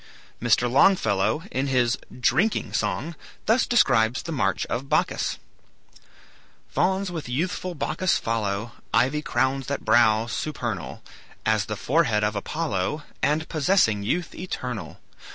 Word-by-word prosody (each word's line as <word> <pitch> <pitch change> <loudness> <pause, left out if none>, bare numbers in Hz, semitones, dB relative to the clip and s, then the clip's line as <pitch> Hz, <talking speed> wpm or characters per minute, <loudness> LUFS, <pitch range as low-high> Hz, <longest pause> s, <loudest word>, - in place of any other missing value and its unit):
Mr. 120 +1 +3
Longfellow 135 - +3
in 135 +2 -1
his 125 -2 +2 0.2
"Drinking 145 - +1
Song" 105 - -1 0.3
thus 230 +3 +3
describes 120 - +3
the 165 - -5
march 100 -10 0
of 130 +4 -4
Bacchus: - - 0 1.3
"Fauns 190 0 0
with 160 -7 -5
youthful 175 +6 -2
Bacchus 165 +4 0
follow; 110 -1 -2 0.2
Ivy 130 +6 +2
crowns 135 -2 0
that 140 - -3
brow, 110 -1 +4
supernal 150 +6 -4 0.4
As 110 -1 +2
the 105 - -4
forehead 125 -7 +2
of 105 0 0
Apollo, 150 - -2 0.2
And 155 +3 +1
possessing 150 - +2
youth 170 - -2
eternal. 125 - -5
130 Hz, 120 wpm, -25 LUFS, 110-160 Hz, 1.3 s, brow